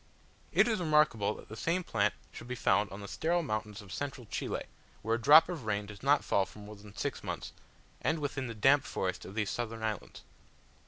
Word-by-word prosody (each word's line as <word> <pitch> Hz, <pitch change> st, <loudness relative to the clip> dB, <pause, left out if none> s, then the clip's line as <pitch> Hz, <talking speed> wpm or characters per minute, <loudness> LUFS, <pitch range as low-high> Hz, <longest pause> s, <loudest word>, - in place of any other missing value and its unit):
It -, -, +5 dB
is 220 Hz, -4 st, +1 dB
remarkable 150 Hz, -, +3 dB
that -, -, -12 dB
the 110 Hz, -, -8 dB
same 170 Hz, +8 st, 0 dB
plant 105 Hz, -8 st, +1 dB, 0.2 s
should 115 Hz, -, -10 dB
be 125 Hz, -, -3 dB
found 100 Hz, -3 st, +2 dB
on 100 Hz, +1 st, -8 dB
the 100 Hz, -, -7 dB
sterile 170 Hz, -, 0 dB
mountains 105 Hz, -5 st, -3 dB
of 95 Hz, -, -10 dB
central 135 Hz, -4 st, -4 dB
Chile, -, -, -3 dB, 0.4 s
where 110 Hz, -, 0 dB
a 115 Hz, -, 0 dB
drop 150 Hz, +7 st, +8 dB
of 170 Hz, -9 st, -5 dB
rain 105 Hz, -1 st, 0 dB
does 105 Hz, -1 st, -11 dB
not 140 Hz, +2 st, +4 dB
fall 95 Hz, -1 st, +2 dB
for 85 Hz, -, -15 dB
more 105 Hz, +1 st, -9 dB
than 105 Hz, 0 st, -14 dB
six -, -, -3 dB
months, -, -, -5 dB, 0.5 s
and 160 Hz, -, +1 dB
within 140 Hz, -3 st, -3 dB
the 115 Hz, -, -6 dB
damp 135 Hz, +6 st, +5 dB
forests 95 Hz, -7 st, -3 dB
of 95 Hz, -, -9 dB
these 110 Hz, -2 st, 0 dB
southern 115 Hz, -2 st, -4 dB
islands. 110 Hz, -3 st, -4 dB
115 Hz, 215 wpm, -32 LUFS, 105-145 Hz, 0.5 s, drop